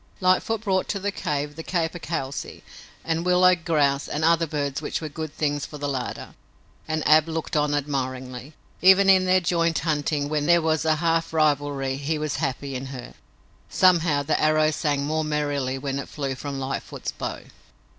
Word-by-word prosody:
Lightfoot 185 +4 +2
brought 190 -3 0
to 200 - -2
the 200 +1 -2
cave 145 -4 -3
the 160 - -6
capercailzie 165 -5 -3 0.4
and 165 0 -1
willow 180 0 +5
grouse 150 -5 +1
and 150 - -3
other 165 0 +3
birds 145 -2 -2
which - - -3
were 155 - -5
good 155 +1 -6
things 145 -2 -1
for 150 - -9
the 145 0 -3
larder, 130 -3 -4 0.5
and 155 0 -1
Ab 155 +1 +6
looked 160 -1 -3
on 150 -1 +2
admiringly. 130 -1 -4 0.3
Even 190 +1 +7
in 185 -1 +4
their 185 0 +4
joint 170 -2 +1
hunting, 150 -1 -1
when 150 -1 -1
there 170 0 +6
was 160 -1 0
a 155 -1 +3
half 165 +1 0
rivalry, 145 -3 +1
he 145 +3 -2
was 150 0 -2
happy 135 +1 -3
in 130 +1 -5
her. 130 -2 -8 0.6
Somehow, 170 -6 +3
the 150 +2 0
arrow 155 0 +3
sang 145 -2 -1
more 155 +1 0
merrily 145 -3 -1
when 135 0 -3
it - - -7
flew 140 -3 -3
from 140 +1 -5
Lightfoot's 135 0 -4
bow. - - -5
150 Hz, 175 wpm, -24 LUFS, 140-165 Hz, 0.6 s, Even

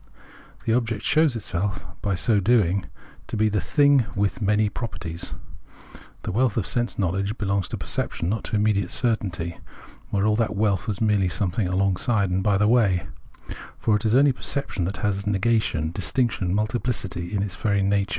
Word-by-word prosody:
The 110 - +2
object 115 -3 0
shows 155 -4 +3
itself 95 -2 -3 0.2
by 100 -2 0
so 105 +4 +2
doing 100 -3 +2 0.4
to - - -4
be 110 0 +3
the 105 -2 0
thing 140 - +4
with 100 +5 0
many 105 +1 +2
properties. 95 -6 -6 0.9
The - - -3
wealth 120 +2 +1
of 105 - +1
sense 120 -1 -1
knowledge 100 +3 -1
belongs 100 -3 0
to - - -4
perception, 85 - -2
not 105 +3 -1
to - - -2
immediate 105 -1 +1
certainty, 90 -8 -1 0.5
where 100 0 0
all 105 0 +3
that 115 -2 0
wealth 100 0 +1
was 105 -2 -3
merely 105 -4 +2
some 95 0 -1
thing 100 +1 -1
alongside 100 +3 +1
and 95 +1 +1
by 100 0 +2
the 105 +1 +3
way; 105 -7 +3 0.7
for 110 - +2
it 105 - -1
is 110 +1 +2
only 140 +1 +6
per 125 - -10
ception 135 -10 -1
that 95 +2 -3
has 100 0 -1
negation, 100 -6 +1
distinction, 105 0 0
multiphcity 105 -4 -2
in 100 -2 0
its 100 - -4
very 100 -2 +1
nature. 100 0 +1
105 Hz, 180 wpm, -24 LUFS, 95-115 Hz, 0.9 s, only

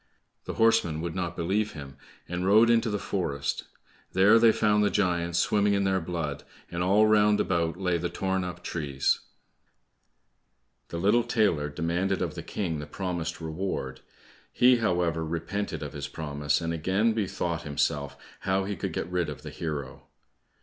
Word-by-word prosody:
The - - -5
horsemen 115 -9 +3
would 85 -1 -3
not 90 -2 -3
believe 100 +5 0
him, 70 -2 -9 0.3
and 90 +1 -3
rode 110 +5 +6
into 115 0 +3
the 105 - -1
forest; 70 -9 -2 0.5
there 105 +4 +6
they 115 -1 +7
found 105 -1 +2
the 105 - +3
giants 85 -4 0
swimming 100 +3 +3
in 100 - +1
their 95 -1 +1
blood, 80 -4 -4 0.3
and 85 - -3
all 100 +4 +4
round 105 -1 +4
about 85 -2 0
lay 90 -2 0
the 85 +1 -2
torn 95 -1 -1
up 90 0 -6
trees. 70 -5 0 1.7
The 85 - -5
little 105 +7 +3
tailor 85 -12 +1
demanded 85 +6 -1
of - - -3
the - - -6
King 85 -6 -3
the 75 - -6
promised 85 0 -4
reward; 80 +4 -4 0.5
he, 125 0 +5
however, 85 -7 0
repented 85 +6 -3
of - - -6
his - - -5
promise, 75 -1 -1
and 85 0 -2
again 95 +8 +1
bethought 90 -6 -2
himself 70 -1 -1 0.2
how 95 0 0
he 100 +1 -3
could - - -4
get - - -2
rid 90 -3 -1
of 75 - -8
the - - -7
hero. 70 -5 -5
90 Hz, 165 wpm, -27 LUFS, 80-100 Hz, 1.7 s, they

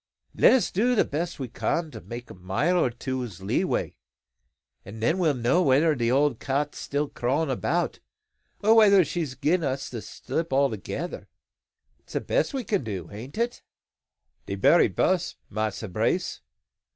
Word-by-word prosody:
Let - - +6
us 260 - +2
do 245 +6 +2
the - - +3
best 170 +4 -3
we 130 - -3
can 160 +6 -2
to - - -9
make 120 +1 -8
a - - -8
mile 95 - 0
or - - +2
two's 120 -4 -5
leeway; 95 - -1 0.9
an' 105 +3 -10
then 160 +11 +1
we'll 160 -5 +2
know 125 +9 +2
whether 150 +1 +4
the 120 -4 0
old 135 -1 +2
Cat's 140 +2 -2
still 145 +1 -1
crawling 140 +4 -1
about, 130 - -1 0.6
or 220 +2 +6
whether 200 -5 +6
she's 155 -4 -3
gin 165 +7 +1
us 135 -1 -2
the 120 -3 -6
slip 160 +9 -4
altogether. 135 - -1 0.7
That's - - -17
the - - 0
best - - 0
thing 275 - -3
we 260 - -2
can 200 -8 0
do, 95 -7 -5
ain't 115 - -9
it?" 235 +1 -1 0.9
"De - - -2
berry - - +5
bess, 185 -3 0 0.2
Massa 110 +1 -2
Brace. 90 - -1
140 Hz, 165 wpm, -26 LUFS, 120-175 Hz, 0.9 s, Let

